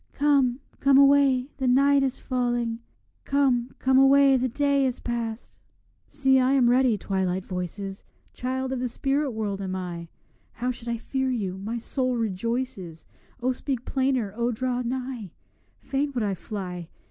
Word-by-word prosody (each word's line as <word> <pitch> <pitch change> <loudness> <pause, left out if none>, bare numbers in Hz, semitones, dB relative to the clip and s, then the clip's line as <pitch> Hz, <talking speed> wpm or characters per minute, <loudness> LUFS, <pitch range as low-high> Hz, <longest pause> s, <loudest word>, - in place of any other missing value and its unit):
Come, 275 -3 +2 0.2
come 275 -1 +5
away, 275 -1 +4
the 265 -2 -1
night 275 +2 +4
is 270 -1 -1
falling; 240 -2 -1 0.4
'Come, 260 -3 +1
come 260 0 +3
away, 275 0 +6
the 255 0 +1
day 280 +2 +1
is 255 -2 -1
past.' 235 -1 -4 0.5
See, 265 -2 +3
I 260 +1 +3
am 250 -3 +4
ready, 250 -3 +3
Twilight 190 -1 -2
voices! 195 +2 -5 0.3
Child 260 +1 -3
of 265 - -2
the 250 0 -2
spirit 275 +4 0
world 210 -4 -3
am 190 -1 -3
I; 175 -2 -5 0.5
How 250 +2 -2
should 235 -1 -10
I 235 - -1
fear 265 +3 -2
you? 195 -7 -2
my 220 +4 -4
soul 255 +2 -1
rejoices, 220 -4 -3 0.4
O 255 - +2
speak 255 -1 -4
plainer! 260 -6 0
O 235 +1 0
draw 250 +1 -2
nigh! 250 -5 -4 0.5
Fain 280 +1 -1
would 240 - 0
I 200 -2 0
fly! 180 -3 -6
250 Hz, 160 wpm, -25 LUFS, 215-265 Hz, 0.5 s, away